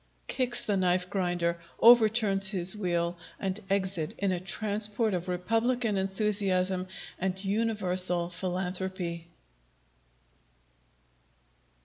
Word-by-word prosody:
[_Kicks 250 -2 +2
the 205 -2 0
Knife 180 0 0
grinder, 175 -3 -1 0.2
overturns 220 -4 +5
his 190 -1 +3
wheel, 175 -3 -2 0.2
and 195 +1 -3
exit 190 -2 -1
in 200 -1 -1
a 180 - -2
transport 210 +3 0
of 180 0 -3
republican 225 +5 -1
enthusiasm 190 -2 +1 0.3
and 190 +1 -3
universal 185 -5 +1
philanthropy. 180 -1 -4
190 Hz, 90 wpm, -28 LUFS, 180-210 Hz, 0.3 s, overturns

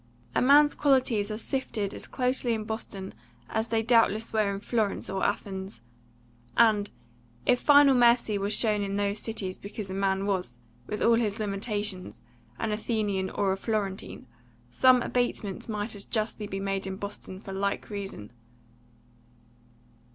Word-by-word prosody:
A - - +2
man's 290 +3 +6
qualities 255 -7 +2
are 215 - -3
sifted 225 -4 -3
as - - -7
closely 250 -2 0
in 220 - -4
Boston 215 -3 -5 0.3
as 220 +1 -1
they 225 -1 0
doubtless 225 -1 +3
were 215 -2 +2
in 195 - -4
Florence 215 -1 -1
or 190 0 -2
Athens; 195 - -3 0.8
and, 215 -3 +4 0.6
if 250 - +4
final 285 -1 +6
mercy 235 -4 +4
was 200 +1 -1
shown 215 -1 +2
in 200 0 -2
those 205 +1 0
cities 200 -5 -4
because 200 -1 -7
a - - -3
man 195 0 0
was, 180 -12 -2 0.3
with 210 - -3
all 235 - +5
his 215 -3 0
limitations, 205 -2 -3 0.3
an 225 - -2
Athenian 210 -3 -1
or 195 -2 0
Florentine, 200 -1 -3 0.5
some 255 -2 +5
abatement 240 -5 -2
might 210 +1 -2
as 200 - -3
justly 215 -1 -2
be 195 -1 -4
made 195 0 -2
in 190 - -4
Boston 200 -1 -7
for 195 -1 -8
like 200 +2 -2
reason. 195 - -6
210 Hz, 150 wpm, -28 LUFS, 195-230 Hz, 0.8 s, man's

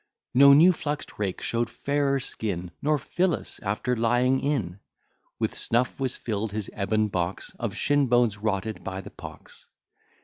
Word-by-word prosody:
No 140 +2 +8
new 170 +6 +7
flux'd 150 -2 -4
rake 100 -3 -2
show'd 115 0 -1
fairer 140 +2 0
skin; 95 -9 -4
Nor 150 +1 +2
Phyllis 175 +5 -1
after 105 +4 -1
lying 120 +3 +2
in. 110 -11 -2 0.6
With - - -1
snuff 120 +4 0
was 130 -2 -2
fill'd 110 -2 -3
his 105 -2 -3
ebon 105 +1 +1
box, 90 -1 -3
Of - - -3
shin 145 -1 +2
bones 120 -4 +2
rotted 105 0 -2
by 95 0 -4
the - - -11
pox. - - -12
115 Hz, 150 wpm, -26 LUFS, 100-140 Hz, 0.6 s, No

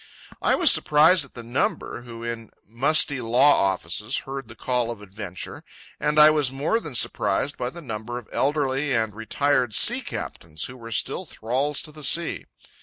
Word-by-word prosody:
I - - +3
was - - +5
surprised 155 +2 +4
at 140 - -21
the 120 - -7
number, 120 0 -2
who, 115 -1 -10
in 115 -2 -5 0.2
musty 135 +4 +1
law 125 +4 +4
offices, 100 +7 -3
heard 135 -2 -6
the 120 - -12
call 125 -2 -1
of 115 -3 -6
adventure; 100 -2 -8 0.4
and 150 0 0
I 150 0 +9
was 150 -4 0
more 145 +12 0
than 150 - -8
surprised 140 +4 0
by 125 - -3
the 170 +5 -11
number 115 -1 -5
of 125 - -9
elderly 140 0 0
and 110 -2 0
retired 125 +2 0
sea - - +6
captains 80 -1 -6
who 125 - -6
were 115 -2 -10
still 175 +10 -2
thralls 135 +6 -2
to 155 - -7
the 150 0 -12
sea. 170 +3 +2
125 Hz, 180 wpm, -24 LUFS, 115-145 Hz, 0.4 s, I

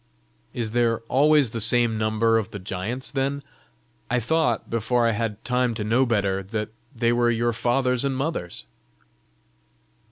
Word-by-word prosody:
"Is 115 -3 -3
there 115 -1 +1
always 140 +2 +3
the 115 - -3
same 115 +1 +4
number 110 +1 +2
of 110 - -5
the 105 - -7
giants 100 +7 -4
then? 140 +1 -2 0.7
I 125 +1 +1
thought, 150 -1 0
before 115 +1 0
I 115 - +3
had 110 -1 -3
time 125 -1 0
to 110 - -3
know 120 +5 +2
better, 100 -4 0
that 105 +2 -4 0.3
they 115 0 +1
were 120 0 +2
your 120 0 +1
fathers 125 +2 +1
and 135 -1 -1
mothers." 135 - -4
115 Hz, 155 wpm, -24 LUFS, 110-125 Hz, 0.7 s, same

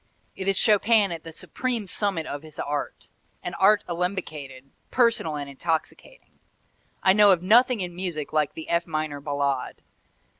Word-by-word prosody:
It 190 - -5
is 195 -1 +2
Chopin 210 -1 +4
at 165 -2 -6
the 165 - -9
supreme 235 +6 -4
summit 190 -4 -1
of 145 -1 -5
his 155 -1 -14
art, 145 0 -4 0.4
an - - -4
art 205 +2 +4
alembicated, 155 -7 -4 0.2
personal 230 -11 +2
and 145 -1 -5
intoxicating. 160 - -5 0.6
I 190 - +6
know 205 0 +6
of 180 -2 +2
nothing 235 +3 +4
in 175 -1 -5
music 175 -5 -4
like 150 -2 +1
the 160 - -7
F 170 0 0
minor 155 -2 -3
Ballade. 140 -2 -2
170 Hz, 155 wpm, -25 LUFS, 150-200 Hz, 0.6 s, I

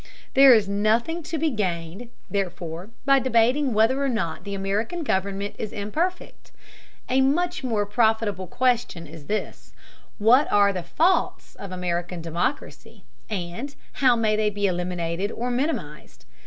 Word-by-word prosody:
There 270 -2 +8
is 210 -3 +2
nothing 220 +11 +1
to 320 +1 -4
be 315 0 +1
gained, 185 0 -3 0.2
therefore, 180 -2 -4 0.2
by 275 -1 +5
debating 255 +2 +2
whether 230 +6 +2
or 275 - +1
not 190 -6 -3
American 200 - -2
government 200 -3 -1
is 215 - -4
imperfect. 310 - -4 0.6
A 260 +1 +2
much 340 +4 +1
more 220 -5 0
profitable 210 -3 +1
question 240 -6 0
is 155 -1 -12
this: 215 +1 -4 0.4
What 245 +7 +4
are 200 -1 +4
the 185 - -3
faults 325 - 0
of 200 -2 -9
American 175 -1 -3
democracy, 170 - -4 0.3
and 205 +8 -5 0.2
how 255 -3 +4
may 220 -2 +1
they 215 0 +1
be 205 0 -2
eliminated 180 +1 -2
or 245 +2 -3
minimized? 245 - -4
210 Hz, 140 wpm, -24 LUFS, 185-255 Hz, 0.6 s, There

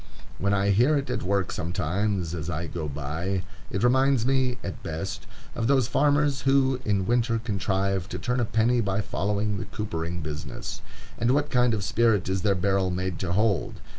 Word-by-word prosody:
When 100 - +1
I 100 0 +2
hear 125 +9 +4
it 140 - -3
at - - -1
work 95 +1 0
sometimes, 90 +2 -1
as 80 -1 -4
I 85 0 -2
go 80 -2 -4
by, 80 +7 -3 0.3
it 100 - -2
reminds 130 -1 +3
me, 130 -1 +1
at 95 - -5
best, 80 +4 -5 0.3
of 115 - -1
those 135 -3 +3
farmers 145 +1 +2
who 135 -1 +3
in 100 -5 +1
winter 120 +1 +2
contrive 100 -3 -1
to - - -4
turn 125 +1 -1
a 120 - +2
penny 115 +3 +2
by 100 -1 0
following 105 +1 -1
the - - -4
coopering 85 -4 -4
business. 75 0 -6 0.4
And 120 - +1
what 145 0 0
kind 125 -3 +3
of 100 - -3
spirit 110 -2 +2
is 95 0 0
their 100 0 +2
barrel 95 0 +1
made 90 -1 -2
to 90 -2 -1
hold? 100 -3 +1
100 Hz, 185 wpm, -26 LUFS, 95-120 Hz, 0.4 s, hear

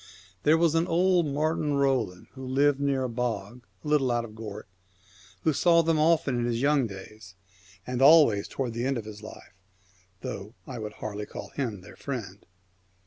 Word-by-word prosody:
There 155 +2 +4
was 165 -1 +3
an 165 +1 +2
old 175 0 +3
Martin 150 0 0
Roland, 130 -10 0
who 130 - -10
lived 135 +2 +2
near 140 -2 +1
a - - 0
bog 120 -1 -4 0.2
a - - -5
little 145 -4 +2
out 120 -1 0
of 110 - -12
Gort, 105 -2 -8 0.8
who 160 - +3
saw 170 +2 +4
them 165 -1 +2
often 155 -5 +3
from 120 - 0
his 120 -1 -1
young 140 -1 +2
days, 100 -1 -11 0.5
and 125 0 -3
always 140 -9 +6
towards 125 -4 -3
the 115 +1 -3
end 135 -1 0
of 110 - -5
his 105 -1 -9
life, 110 -3 -12 0.7
though 110 -3 -6
I 125 -4 -7
would 105 -1 -6
hardly 105 -1 -6
call - - -8
him 115 -9 -4
their 85 - -13
friend. 110 -8 -6
130 Hz, 185 wpm, -27 LUFS, 110-150 Hz, 0.8 s, always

